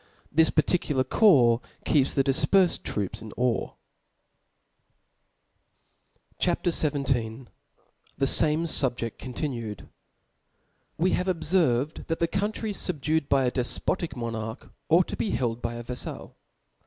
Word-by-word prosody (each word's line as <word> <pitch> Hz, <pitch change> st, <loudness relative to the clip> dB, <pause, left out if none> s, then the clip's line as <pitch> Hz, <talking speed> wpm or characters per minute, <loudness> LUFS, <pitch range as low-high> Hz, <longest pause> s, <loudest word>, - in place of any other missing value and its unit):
This 160 Hz, +2 st, +5 dB
parttcular 150 Hz, -4 st, +1 dB
corps 130 Hz, -, +5 dB, 0.2 s
keeps 140 Hz, -3 st, +2 dB
^he 135 Hz, -, +3 dB
difperfed 160 Hz, +7 st, +2 dB
troops 100 Hz, -3 st, -4 dB
in 110 Hz, -, -9 dB
awe. 125 Hz, -1 st, 0 dB, 2.7 s
CHAP. -, -, 0 dB
XVII. 150 Hz, -4 st, +1 dB
T^hejame 120 Hz, -2 st, -2 dB, 0.7 s
SubjeSi 140 Hz, -4 st, +2 dB
continued. 120 Hz, -, -5 dB, 1.1 s
\JU 170 Hz, -, +1 dB
E -, -, +4 dB
have 180 Hz, -, -1 dB
obferved 160 Hz, -6 st, 0 dB
that 165 Hz, -, -1 dB
the 170 Hz, -, +1 dB
countries 205 Hz, +3 st, -2 dB
fubducd 160 Hz, -2 st, -1 dB
^^ -, -, -41 dB
by 135 Hz, -1 st, +3 dB
a 125 Hz, -, +1 dB
defpotic 145 Hz, +7 st, -1 dB
monarch, 115 Hz, -1 st, -5 dB, 0.2 s
ought 170 Hz, +2 st, +4 dB
to -, -, -4 dB
be 215 Hz, -, -2 dB
held 120 Hz, -7 st, -2 dB
by 120 Hz, 0 st, -3 dB
a 120 Hz, -, -6 dB
yaffal. 125 Hz, +1 st, -6 dB
140 Hz, 120 wpm, -26 LUFS, 120-165 Hz, 2.7 s, This